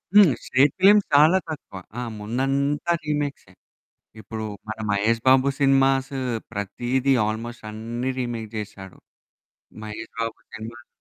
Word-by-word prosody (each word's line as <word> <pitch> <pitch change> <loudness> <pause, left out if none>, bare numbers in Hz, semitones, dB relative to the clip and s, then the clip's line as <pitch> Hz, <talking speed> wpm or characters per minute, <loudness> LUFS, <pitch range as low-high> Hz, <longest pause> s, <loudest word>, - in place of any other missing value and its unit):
హ్మ్. 200 -8 +8
Straight 135 +2 +3
films 205 +1 +6
చాలా 155 +6 +7
తక్కువ. 140 -11 -7 0.2
ఆ! - - -2 0.2
ముందంతా 135 +8 0
రీమేక్సే. 145 -9 -3 0.7
ఇప్పుడు 110 +1 -6 0.2
మన 110 - -4
మహేష్ 110 +3 +2
బాబు 130 +1 +5
సినిమాసు 135 0 +3 0.3
ప్రతీది 120 +6 0
ఆల్‌మోస్ట్ 115 +1 -5
అన్నీ 115 +4 -4
రీమేక్ 120 -3 -3
చేశాడు. 95 -3 -7 0.9
మహేష్ 110 +1 -7
బాబు 115 0 -2 0.2
సినిమాకి 115 +4 -9
125 Hz, 115 wpm, -24 LUFS, 110-140 Hz, 0.9 s, హ్మ్